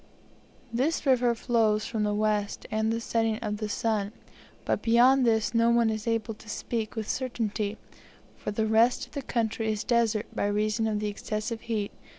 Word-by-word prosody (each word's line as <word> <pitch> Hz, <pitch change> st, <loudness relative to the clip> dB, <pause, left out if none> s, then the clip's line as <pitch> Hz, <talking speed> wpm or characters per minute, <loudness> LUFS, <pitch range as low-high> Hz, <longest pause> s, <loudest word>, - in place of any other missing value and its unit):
This 280 Hz, +9 st, 0 dB
river 250 Hz, -3 st, +3 dB
flows 225 Hz, -3 st, +1 dB
from 220 Hz, -2 st, -2 dB
the 210 Hz, 0 st, +1 dB
west 210 Hz, -1 st, 0 dB
and 220 Hz, +1 st, +1 dB
the 230 Hz, -, -1 dB
setting 225 Hz, -1 st, 0 dB
of 210 Hz, -1 st, -3 dB
the 215 Hz, 0 st, -4 dB
sun; 210 Hz, -1 st, -1 dB, 0.5 s
but -, -, 0 dB
beyond 245 Hz, +3 st, +5 dB
this 220 Hz, 0 st, +2 dB
no 230 Hz, 0 st, +4 dB
one 235 Hz, -1 st, +3 dB
is 215 Hz, +1 st, -4 dB
able 225 Hz, -1 st, 0 dB
to 210 Hz, 0 st, -15 dB
speak 225 Hz, +1 st, -3 dB
with 220 Hz, -2 st, -3 dB
certainty, 220 Hz, -5 st, -2 dB, 0.6 s
for -, -, -6 dB
the 220 Hz, +1 st, 0 dB
rest 225 Hz, +3 st, +3 dB
of -, -, -24 dB
the 285 Hz, -, -4 dB
country 225 Hz, -3 st, -1 dB
is 215 Hz, +1 st, -2 dB
desert 230 Hz, -3 st, +1 dB
by -, -, 0 dB
reason 215 Hz, +2 st, 0 dB
of 210 Hz, -1 st, 0 dB
the 210 Hz, -, -1 dB
excessive 215 Hz, +2 st, -4 dB
heat. 220 Hz, -3 st, -2 dB
220 Hz, 180 wpm, -28 LUFS, 215-235 Hz, 0.6 s, beyond